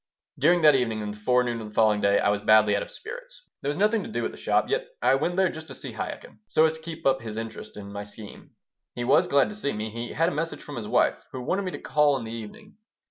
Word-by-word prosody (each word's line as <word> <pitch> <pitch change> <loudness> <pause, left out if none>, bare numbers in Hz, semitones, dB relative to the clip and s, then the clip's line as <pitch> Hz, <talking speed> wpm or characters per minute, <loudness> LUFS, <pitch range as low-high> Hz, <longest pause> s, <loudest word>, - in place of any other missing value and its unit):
During 170 +4 +4
that 150 -1 +8
evening 115 -5 0
and 105 0 -4
the 105 - -13
forenoon 120 +1 +1
of 110 - -7
the 105 - -12
following 110 -2 +4
day 100 0 +4
I - - +2
was 105 0 0
badly 105 -1 +5
out 100 - 0
of - - -6
spirits - - -9
There 140 - -2
was 145 - -2
nothing 210 +3 +3
to - - -7
do - - -2
at - - -2
the - - -11
shop, - - +1
yet 475 +2 -1
I - - +3
went 155 +6 0
there 190 -1 +3
just 160 0 -9
to - - -8
see - - -7
Chaikin, - - -6
so 155 - +4
as 160 - +2
to 160 - -10
keep 165 0 -8
up 135 0 +3
his 110 -2 -6
interest 115 -1 -7
in 100 -1 -8
my 100 0 -4
scheme. 105 +1 -11 0.5
He 120 - -3
was 120 - +4
glad 140 -1 +3
to 210 - -7
see 195 -9 -1
me. 110 +1 -4
He 115 +2 -5
had 165 +1 +2
a - - -5
message 165 +3 -3
from 145 - -8
his 110 -3 -5
wife, - - +2
who 130 - -6
wanted 195 +9 -1
me 185 - -2
to - - -5
call 145 0 +2
in 125 - -6
the 110 - -7
evening. 115 - -9
130 Hz, 290 wpm, -26 LUFS, 110-165 Hz, 0.5 s, that